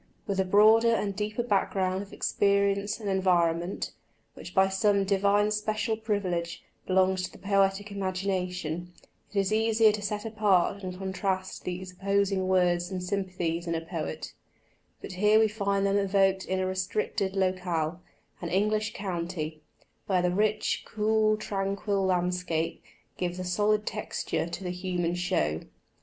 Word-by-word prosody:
With 200 -3 -2
a 190 - +3
broader 215 +4 +6
and 200 -3 -2
deeper 215 +3 -2
background 190 -3 0
of 200 - -10
experience 200 +1 +1
and 210 - -6
environment, 175 -2 +1 0.4
which 180 - -11
by 190 0 +5
some 200 +1 +2
divine 200 +1 +2
special 215 +1 -1
privilege 185 -6 -2 0.2
belongs 185 0 +3
to 185 - -4
the - - -14
poetic 195 0 +1
imagination, 185 -3 -3 0.4
it 205 - -6
is 195 +2 +1
easier 220 0 +4
to 210 0 -4
set 205 +1 -3
apart 200 -3 +2
and 185 -1 -6
contrast 190 0 -3
these 180 +1 -4
opposing 195 0 0
words 175 -2 +2
and 185 -2 -4
sympathies 180 -3 -2
in 165 - 0
a 165 - -2
poet; 165 - -5 0.7
but - - -6
here 210 +4 +4
we 220 0 +5
find 200 -2 0
them 200 0 +2
evoked 195 -1 +2
in 190 0 -1
a 185 - 0
restricted 190 +1 -1
locale 180 -3 -1 0.4
an 170 - -3
English 215 +3 +1
county 170 -5 -4 0.5
where 185 -2 +2
the 180 - +2
rich, 210 +3 +1
cool 215 0 +1
tranquil 195 -1 -1
landscape 180 -2 -1 0.4
gives 180 -1 -2
a 185 - -4
solid 210 +3 +1
texture 210 -5 -3
to 175 +2 -6
the 180 - -2
human 180 -1 -2
show. 175 - 0
190 Hz, 150 wpm, -28 LUFS, 180-205 Hz, 0.7 s, broader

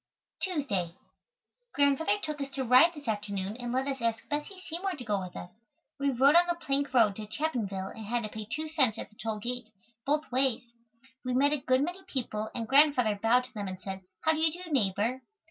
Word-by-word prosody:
Tuesday. 240 - -1 0.8
Grandfather 285 +8 +3
took 305 -2 -3
us 275 - -3
to 270 -1 -3
ride 255 +7 +7
this 290 -3 -10
afternoon 205 -2 -2
and 245 -1 -4
let 260 +2 0
us 270 -2 -2
ask 230 -1 -1
Bessie 295 +6 -3
Seymour 365 +4 -2
to 280 -7 -7
go 210 -3 0
with 180 -1 -8
us. 175 - -7 0.5
We 280 0 +2
rode 270 +2 +5
on 345 +1 +6
the 345 - +1
plank 280 -4 -1
road 225 -6 +4
to 215 -1 -6
Chapinville 210 -8 -2
and 220 -2 -8
had 240 +1 0
to 215 - -4
pay 215 0 -7
2 310 +4 -2
cents 270 -9 +2
at - - -7
the - - -23
toll 220 0 -3
gate, 240 +1 -5 0.3
both 300 +1 0
ways. 255 -2 +2 0.6
We 250 -1 -1
met 285 +3 +4
a - - +3
good 255 +1 +2
many 355 +4 -4
people 220 -8 -3
and 230 -1 -3
Grandfather 265 -6 +4
bowed 245 +3 +4
to 255 0 -11
them 205 -3 -4
and 185 -1 -6
said, 190 0 -6 0.2
"How 315 - +3
do 315 - -2
you 320 0 +4
do, 350 +1 -8
neighbor?" 225 0 +1
255 Hz, 215 wpm, -30 LUFS, 215-295 Hz, 0.8 s, ride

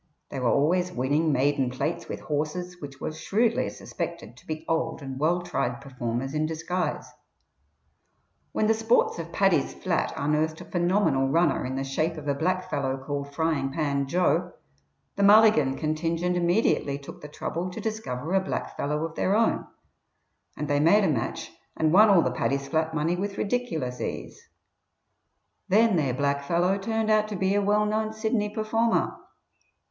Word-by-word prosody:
They 135 - -5
were 125 -2 +1
always 175 +7 +2
winning 145 +5 +1
maiden 135 -1 +1
plates 150 +7 -3
with - - -5
horses 175 +4 -3
which 140 -2 -9
were - - -3
shrewdly 215 +9 0
suspected - - -6
to - - -19
be 155 0 -5
old 160 -1 -1
and 135 -1 -6
well 175 +4 +1
tried 120 -6 -2
performers 125 0 -4
in 155 0 0
disguise. 165 +3 -2 1.5
When 215 - 0
the 220 - +4
sports 225 -4 +2
of 165 0 -6
Paddy's 195 -7 +2
Flat 180 -2 -1
unearthed 150 +2 0
a - - -9
phenomenal 175 -6 +1
runner 170 +5 +2
in 130 - -4
the 135 - -2
shape 155 +5 -1
of 150 -1 -7
a 140 - +2
blackfellow 145 -4 -1
called 140 0 -4
Frying 155 -4 0
pan 140 -2 -1
Joe, 175 +2 +1 0.6
the - - 0
Mulligan 200 -10 +6
contingent 165 +3 -1
immediately 175 -5 +1
took 140 - -11
the 150 - -8
trouble 170 +4 -4
to 180 - -7
discover 180 - -4
a 195 - +4
blackfellow 150 -4 -3
of 165 - -6
their 190 +4 +1
own, 225 +1 +1 0.9
and 150 - -3
they 145 0 +1
made 200 +8 +5
a - - +3
match 120 -6 -2 0.3
and 155 0 +2
won 210 +3 +7
all 190 -4 +6
the 130 - 0
Paddy's 140 +2 -1
Flat 160 +2 -1
money 160 +3 +1
with 200 +2 -4
ridiculous 200 - -2
ease; - - -6 1.2
then 220 +2 +4
their 140 -7 +1
blackfellow 145 +7 +1
turned 220 +1 0
out 215 0 +3
to 210 - -5
be 190 +1 +1
a 205 - +2
well 210 +1 +2
known 215 +1 -1
Sydney 220 -1 -1
performer. 225 +2 0
160 Hz, 165 wpm, -26 LUFS, 140-195 Hz, 1.5 s, won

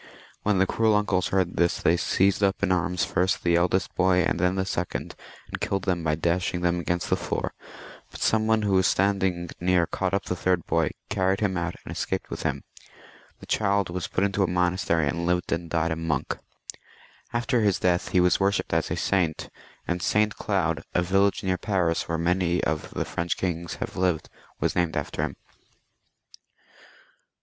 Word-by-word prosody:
When 105 -1 +1
the 95 - +4
cruel 110 +2 +2
uncles 100 -3 +1
heard 95 -2 0
this, 85 0 +2
they 85 - +3
seized 95 +3 +2
up 100 0 +1
in 100 - +2
their 90 - +4
arms 90 +2 -1
first 90 +1 0
the 85 -1 +3
eldest 90 +1 +1
boy 90 0 +3
and 85 - 0
then 90 +2 +2
the 95 0 0
second, 90 -2 -3 0.3
and - - -6
kiUed 95 -2 -1
them 90 -3 0
by 75 -1 +1
dashing 90 +2 0
them 90 0 +1
against 85 0 -2
the - - +5
floor, - - -3 0.6
but - - -11
some 110 0 +2
one 110 -1 +3
who 100 -1 +1
was 95 -1 +4
standing 95 -3 +1
near 90 -1 +3
caught 95 +3 -1
up 100 - -1
the 90 - -2
third 90 -1 0
boy, 80 -2 +1 0.2
carried 95 -1 +1
him 100 -3 0
out, 85 -1 -2
and - - -7
escaped - - -3
with - - -4
him. - - -2 0.8
The - - -10
child 100 -3 +1
was 90 0 -3
put 95 - -1
into 100 0 +1
a 95 - +3
monas 90 +1 +1
tery, 80 -3 +2
and 85 +4 -2
lived 90 0 0
and 85 0 -2
died 85 0 0
a - - 0
monk. 80 -4 -2 1.0
After 120 +1 +1
his 100 -3 +2
death 90 -1 +1
he 90 - +2
was 90 0 +4
worshipped 100 0 0
as - - +1
a - - -1
saint, 90 -5 0 0.4
and 90 0 -1
St. 105 +3 +2
Cloud, 85 -6 0
a 90 - +3
village 95 +2 +2
near 95 -1 0
Paris, 90 -6 0
where 85 - 0
many 90 +1 +1
of 75 0 -1
the - - -3
French 85 +1 -2
kings 85 -2 -3
have - - -5
lived, 90 -3 0 0.3
was - - 0
named 85 -2 +1
after 75 - -3
him. - - -2
90 Hz, 195 wpm, -26 LUFS, 85-95 Hz, 1.0 s, the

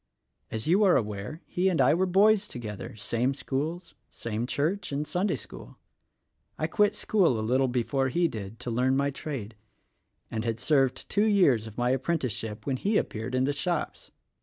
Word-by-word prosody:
As 110 -1 -4
you 185 +7 +4
are 190 -3 +5
aware, 105 - -4
he' 185 +2 +1
and 175 - 0
I - - +5
were 185 +3 +2
boys 205 +3 +4
together; 110 - -7
same 115 +5 -1
schools, 150 +6 -3 0.2
"same 115 +1 -4
church 160 +10 -1
and 145 +2 -1
Sunday 185 +6 0
school. - - -11 0.8
I - - -1
quit 210 -1 +2
school 180 - +2
a 110 - -2
little 130 +3 +2
before 130 +2 0
he 170 +6 +2
did, 105 -4 -7
to 120 - -4
learn 130 +3 +2
my 140 0 +1
trade, 130 -7 -6 0.8
and 110 -1 -2
had 115 -1 -2
served 135 -1 +1
two 205 +1 +2
years 160 - +3
of 110 - -11
my 125 +1 +2
appren 165 +6 0
ticeship 110 -4 -4
when 135 -2 0
he 205 - +1
appeared 115 +4 -2
in 130 - +2
the 145 +2 +1
shops. 170 +2 -3
135 Hz, 185 wpm, -28 LUFS, 115-175 Hz, 0.8 s, are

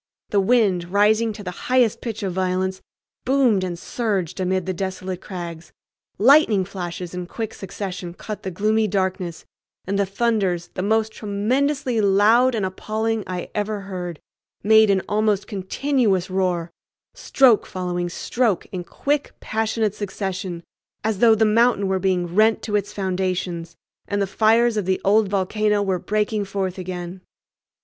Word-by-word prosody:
The 205 - +3
wind, 195 -4 +2
rising 215 +3 +3
to 205 0 -9
the 180 - -4 0.2
highest 250 -4 +3
pitch 225 -2 -5
of 190 -2 -2
violence, 185 0 -1 0.4
boomed 250 -7 +3
and 175 -2 -3
surged 200 -4 -2
amid 185 0 0
the 185 - -2
desolate 185 0 -4
crags; 170 -3 -7 0.4
lightning 225 -4 +5
flashes 180 -2 -6
in 180 -1 -5
quick 220 +3 -5
succession 185 -2 -6
cut 215 +2 -7
the 190 - -4
gloomy 215 +4 +1
darkness; 185 -3 -2 0.4
and 200 +1 -1
the 200 - +1
thunders, 195 -5 0
the 185 - -3
most 220 +2 +1
tremendously 245 +5 0
loud 215 +6 +4
and 210 -4 0
appalling 215 +3 -2
I 180 -1 -5
ever 210 0 -2
heard, 180 -4 -6 0.4
made 220 +1 +6
an 195 -1 +2
almost 210 -1 +1
continuous 200 -1 0
roar, 180 -3 0 0.4
stroke 265 - +3
following 180 -2 -3
stroke 225 +2 0
in 180 -2 -4
quick, 285 +10 -2
passionate 220 -1 -1
succession, 190 -4 -4 0.4
as 215 -2 -1
though 225 -1 +6
the 220 +1 +3
mountain 220 -2 +3
were 190 0 0
being 180 -2 0
rent 215 +3 +3
to 210 - -2
its 205 -1 -1
foundations 185 -3 -2 0.3
and 205 - -1
the 200 - +2
fires 225 +3 +3
of 205 - -1
the 190 - +1
old 210 +2 +4
volcano 205 +2 +1
were 190 -2 0
breaking 210 +2 -1
forth 195 -1 -3
again. 180 0 -6
200 Hz, 150 wpm, -22 LUFS, 185-220 Hz, 0.4 s, made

